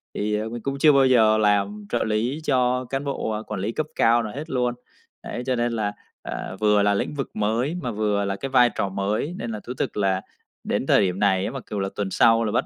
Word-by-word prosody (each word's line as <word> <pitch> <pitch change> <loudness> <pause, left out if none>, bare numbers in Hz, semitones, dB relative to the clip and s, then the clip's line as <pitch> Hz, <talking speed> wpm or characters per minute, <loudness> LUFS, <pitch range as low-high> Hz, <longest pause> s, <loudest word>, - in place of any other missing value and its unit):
thì 105 +1 0
mình 120 0 -5
cũng 140 +2 -3
chưa 150 +1 +7
bao 135 -1 +5
giờ 110 -4 +5
làm 105 0 +1
trợ - - 0
lý 115 +7 -1
cho 125 -1 +1
cán 135 +3 -3
bộ, 140 -5 -3
à, 105 0 -2
quản - - -4
lý 105 +4 -1
cấp 155 - -2
cao 115 +1 +4
nào 105 -2 -6
hết 150 +4 -6
luôn. 125 -3 0 0.5
Đấy, 120 - -5
cho 130 -1 0
nên 120 0 0
là, 105 -2 -1 0.3
à, - - -5
vừa 105 -1 +4
là 100 0 +3
lĩnh 100 - -1
vực 135 -2 -3
mới 115 +9 0
mà 125 - -3
vừa 105 -1 0
là 100 0 -1
cái 135 +8 -5
vai 125 -2 +5
trò 100 - -1
mới, 100 - -2
nên 120 - -4
là 110 - -4
thú 125 - -3
thực - - -3
là 95 -2 +1 0.4
đến - - -1
thời - - +5
điểm 95 -1 0
này 95 -2 +2
á - - -3
mặc 135 -3 -7
cù 105 - -2
là 95 0 -1
tuần 105 - -2
sau 115 +3 +4
là 110 - -1
bắt - - +1
110 Hz, 255 wpm, -24 LUFS, 105-125 Hz, 0.5 s, chưa